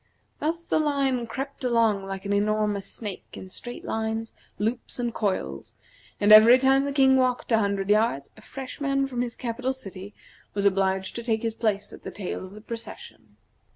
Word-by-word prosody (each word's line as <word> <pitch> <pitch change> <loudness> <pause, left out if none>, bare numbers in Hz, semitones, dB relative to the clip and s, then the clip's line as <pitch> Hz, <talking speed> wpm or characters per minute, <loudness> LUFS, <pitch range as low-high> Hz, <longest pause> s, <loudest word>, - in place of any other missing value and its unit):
Thus 335 +2 -1
the 325 - +1
line 275 -5 +1
crept 270 +4 -6
along 225 -5 +2
like 195 0 -6
an 200 - 0
enormous 210 -1 0
snake 205 -5 -6
in 185 - -9
straight 240 +4 -6
lines, 220 0 -2 0.2
loops, 225 +4 -2
and 240 -2 -2
coils; 70 - -3 0.4
and 205 +1 +6
every 225 +4 +10
time 270 +1 +3
the 280 - -1
King 265 -1 +5
walked 255 -1 0
a 225 - +5
hundred 200 -1 0
yards 210 -10 +2
a - - -15
fresh 265 +1 -8
man 275 -1 +1
from 250 -3 -3
his 245 -1 -3
capital 255 +2 -2
city 200 -5 -9 0.4
was 200 0 0
obliged 190 -1 +1
to 235 - -5
take 225 -1 0
his 225 -1 0
place 215 -3 -1
at - - -11
the - - -6
tail 195 -2 -5
of 185 +1 -10
the 215 - -10
procession. 210 - -9
225 Hz, 190 wpm, -26 LUFS, 200-255 Hz, 0.4 s, every